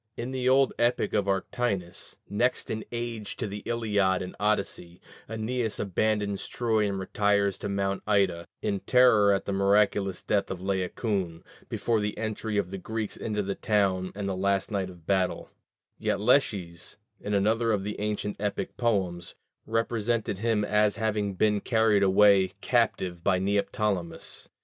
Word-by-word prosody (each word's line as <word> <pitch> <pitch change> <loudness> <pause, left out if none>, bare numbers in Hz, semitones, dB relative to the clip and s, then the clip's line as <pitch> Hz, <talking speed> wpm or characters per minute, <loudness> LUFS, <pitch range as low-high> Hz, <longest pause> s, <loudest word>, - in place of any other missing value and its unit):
In 120 +2 -4
the 130 -1 0
old 135 +1 +4
epic 120 +1 +1
of 100 -2 +1
Arctinus, 95 -2 -2
next 120 +5 0
in 110 0 -3
age 115 -3 -4
to - - -2
the 105 0 -5
Iliad 105 -5 +1
and 90 - -8
Odyssey, 100 -4 -1 0.3
Æneas 110 0 -2
abandons 105 0 0
Troy 110 -3 +1
and 100 - -2
retires 100 0 +1
to 100 - -4
Mount 100 0 -1
Ida, 95 -5 +2 0.2
in 100 -2 0
terror 115 -5 +5
at 100 - 0
the - - -2
miraculous 100 -1 +2
death 100 -1 0
of 95 - -4
Laocoon, 95 -1 -2 0.3
before 115 -2 0
the 105 0 -3
entry 110 -1 -3
of 100 -3 -1
the 95 - -5
Greeks 110 +2 -4
into 105 -2 -2
the 100 0 -2
town 95 -3 +1
and 100 -1 -3
the 95 - -1
last 100 +2 0
night 95 -4 -4
battle: 95 -1 0 0.5
yet - - 0
Lesches, 100 -8 +1 0.2
in 105 0 -2
another 110 +3 +2
of 100 -3 0
the 105 +1 -5
ancient 105 -1 -2
epic 105 0 -3
poems, 95 -7 -1 0.3
represented 115 -2 -1
him 110 -2 +1
as 105 0 +2
having 105 -2 -1
been 105 +1 +2
carried 110 -3 +3
away 95 -1 +5
captive 95 -8 0
by 95 -1 +3
Neoptolemus. 100 -2 -2
105 Hz, 155 wpm, -27 LUFS, 95-110 Hz, 0.5 s, terror